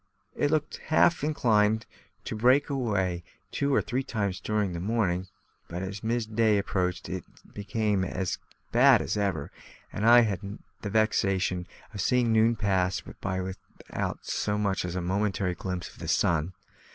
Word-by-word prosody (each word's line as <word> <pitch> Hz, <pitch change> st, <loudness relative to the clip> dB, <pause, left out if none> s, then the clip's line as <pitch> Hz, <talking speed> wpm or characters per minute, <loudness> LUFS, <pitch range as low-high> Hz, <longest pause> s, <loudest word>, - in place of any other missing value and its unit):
It 145 Hz, -, +1 dB
looked 150 Hz, -1 st, 0 dB
half 160 Hz, 0 st, +4 dB
inclined 110 Hz, -7 st, +2 dB, 0.4 s
to -, -, -4 dB
break 125 Hz, +6 st, +3 dB
away 100 Hz, -10 st, -1 dB, 0.3 s
two 140 Hz, 0 st, 0 dB
or -, -, +3 dB
three 130 Hz, +1 st, -1 dB
times 100 Hz, -7 st, -2 dB
during 105 Hz, -4 st, -1 dB
the 85 Hz, -, -4 dB
morning; 95 Hz, -2 st, 0 dB, 0.4 s
but 90 Hz, +2 st, -5 dB
as 100 Hz, +2 st, -6 dB
mid 115 Hz, -1 st, -2 dB
day 110 Hz, -2 st, +4 dB
approached 90 Hz, -3 st, -1 dB
it 95 Hz, -1 st, -4 dB, 0.3 s
became 105 Hz, -1 st, 0 dB
as 95 Hz, 0 st, -2 dB, 0.3 s
bad -, -, +6 dB
as -, -, -2 dB
ever, 95 Hz, -8 st, -1 dB, 0.4 s
and 105 Hz, -, -3 dB
I 120 Hz, +2 st, +8 dB
had 100 Hz, -2 st, -2 dB, 0.2 s
the 105 Hz, -, -4 dB
vexation 95 Hz, -4 st, +1 dB, 0.3 s
of 100 Hz, -, -3 dB
seeing 125 Hz, -3 st, +2 dB
noon 110 Hz, +1 st, +4 dB
pass 95 Hz, -3 st, +1 dB
by 95 Hz, -1 st, -4 dB
without 95 Hz, +1 st, -6 dB
so 105 Hz, 0 st, -1 dB
much 100 Hz, -3 st, 0 dB
as 90 Hz, 0 st, -4 dB
a 90 Hz, -, -1 dB
momentary 95 Hz, 0 st, 0 dB
glimpse 90 Hz, 0 st, -5 dB
of -, -, -18 dB
the -, -, -6 dB
sun. 85 Hz, +1 st, +1 dB
100 Hz, 160 wpm, -28 LUFS, 95-115 Hz, 0.4 s, I